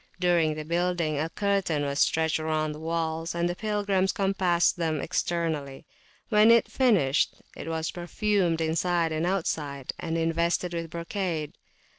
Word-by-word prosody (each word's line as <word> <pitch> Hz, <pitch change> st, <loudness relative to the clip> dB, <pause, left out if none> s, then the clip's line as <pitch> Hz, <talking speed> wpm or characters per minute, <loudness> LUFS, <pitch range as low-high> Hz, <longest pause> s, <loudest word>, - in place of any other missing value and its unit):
During 170 Hz, -4 st, +2 dB
the 155 Hz, 0 st, -6 dB
building, 170 Hz, -2 st, 0 dB
a 160 Hz, +2 st, -1 dB
curtain 195 Hz, -6 st, 0 dB
was 140 Hz, 0 st, -2 dB
stretched 160 Hz, 0 st, +2 dB
round 155 Hz, -1 st, -1 dB
the 150 Hz, -, -9 dB
walls, 165 Hz, 0 st, -2 dB
and 175 Hz, +1 st, 0 dB
pilgrims 205 Hz, -2 st, 0 dB
compassed 190 Hz, -5 st, +1 dB
them 160 Hz, -3 st, -1 dB
externally. 155 Hz, -6 st, -2 dB, 0.4 s
When 225 Hz, +1 st, +6 dB
finished, 195 Hz, -, +2 dB, 0.2 s
it -, -, -8 dB
was 160 Hz, -1 st, -2 dB
perfumed 175 Hz, -1 st, 0 dB
inside 165 Hz, +1 st, +1 dB
and 160 Hz, +2 st, -1 dB
outside, 150 Hz, -7 st, -2 dB
and 165 Hz, 0 st, -2 dB
invested 170 Hz, +2 st, 0 dB
with 165 Hz, -1 st, -4 dB
brocade. 170 Hz, -2 st, -3 dB
170 Hz, 135 wpm, -27 LUFS, 160-180 Hz, 0.4 s, When